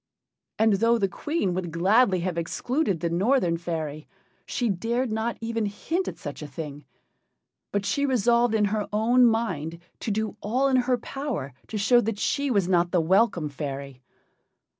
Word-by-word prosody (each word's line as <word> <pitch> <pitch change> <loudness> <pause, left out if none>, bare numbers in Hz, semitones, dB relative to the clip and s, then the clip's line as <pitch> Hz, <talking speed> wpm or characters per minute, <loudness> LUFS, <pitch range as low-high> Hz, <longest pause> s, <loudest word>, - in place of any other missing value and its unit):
And 220 0 +4
though 230 +1 +4
the 200 -3 +1
Queen 245 - -2
would 180 -1 -3
gladly 190 +3 +3
have 180 -1 -2
excluded 195 - -1
the 170 - 0
Northern 185 -1 +2
fairy, 160 -3 -4 0.4
she 245 - -1
dared 230 +5 -1
not 220 +2 -1
even 225 -1 -1
hint 325 - -2
at - - -5
such 145 +1 -7
a 150 - -6
thing. 145 0 -7 0.9
But 200 0 -1
she 280 +8 +1
resolved 240 -2 +3
in 210 -1 +3
her 210 -2 -1
own 240 +4 +4
mind 185 -9 -1 0.2
to - - -4
do 215 +1 -2
all 255 +6 +1
in 260 - +3
her 250 0 +2
power 250 - -5
to 220 - -4
show 240 +4 +4
that 225 -2 -2
she 280 +6 0
was 200 -7 +2
not 175 -1 +3
the 180 - +2
welcome 175 -1 +2
fairy. 140 -2 -6
210 Hz, 170 wpm, -26 LUFS, 170-235 Hz, 0.9 s, And